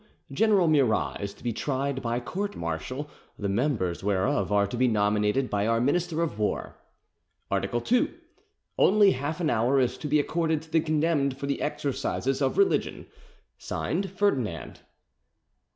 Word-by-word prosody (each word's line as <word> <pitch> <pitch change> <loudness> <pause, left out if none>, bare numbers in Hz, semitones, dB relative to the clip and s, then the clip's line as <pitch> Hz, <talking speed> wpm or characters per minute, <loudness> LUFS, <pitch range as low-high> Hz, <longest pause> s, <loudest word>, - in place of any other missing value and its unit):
General 195 +3 +3
Murat 110 - +2
is 100 0 -3
to - - -19
be 120 -2 -1
tried 135 +2 -2
by 120 0 -1
court−martial, 150 -5 -4 0.3
the 100 - -2
members 100 - -1
whereof 105 +7 0
are 100 0 +3
to 100 - -5
be 125 +1 +3
nominated 105 +3 +1
by 105 -1 0
our 115 0 +2
Minister 165 +5 +1
of 150 -11 -4
War. 105 - -2 0.8
"Art. - - 0 0.2
2. 250 +1 +2 0.7
Only 205 0 +6
half 145 +5 -3
an 160 -3 +1
hour 120 +4 +2
is 125 -1 0
to 150 - -4
be 150 +1 +3
accorded 160 +1 0
to 160 - -18
the 165 - +4
condemned 150 -3 +1
for 140 - -5
the 140 - -2
exercises 140 -2 -2
of 135 - 0
religion. 395 -1 +1 0.5
"(Signed) 195 0 -2
FERDINAND." 135 - -1
135 Hz, 150 wpm, -27 LUFS, 115-160 Hz, 0.8 s, Only